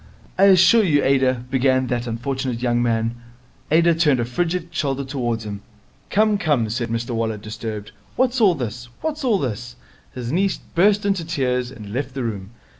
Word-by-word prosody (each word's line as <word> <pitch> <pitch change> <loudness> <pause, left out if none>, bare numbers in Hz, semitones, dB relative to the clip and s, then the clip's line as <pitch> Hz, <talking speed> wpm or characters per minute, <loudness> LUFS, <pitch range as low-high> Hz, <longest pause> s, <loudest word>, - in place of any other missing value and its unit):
'I 195 - +7
assure 190 +3 +6
you, 150 -7 +2
Ada 130 -2 +2
' - - -24
began 130 -1 +2
that 120 -1 -2
unfortunate 125 +1 -3
young 120 -1 +2
man. 115 0 -1 0.5
Ada 170 +2 +4
turned 150 -5 +2
a 120 - 0
frigid 170 +7 -2
shoulder 140 -4 -1
towards 120 -5 -3
him. 100 -1 -6 0.5
'Come, 210 0 +2
come,' 135 - +1
said 120 0 -2
Mr 115 +2 -3
Waller 115 -2 -1
disturbed. 110 0 -6 0.2
'What's 255 -1 +1
all 190 -5 +5
this? 120 -2 -5
What's 310 -2 -3
all 235 -6 +3
this?' 120 - -4 0.4
His 125 -1 -4
niece 190 +4 +1
burst 200 +4 +1
into 195 -4 +1
tears 125 -6 -1
and 105 -5 -10
left 135 +1 -3
the 130 - -2
room. 100 -4 -4
130 Hz, 180 wpm, -21 LUFS, 120-170 Hz, 0.5 s, I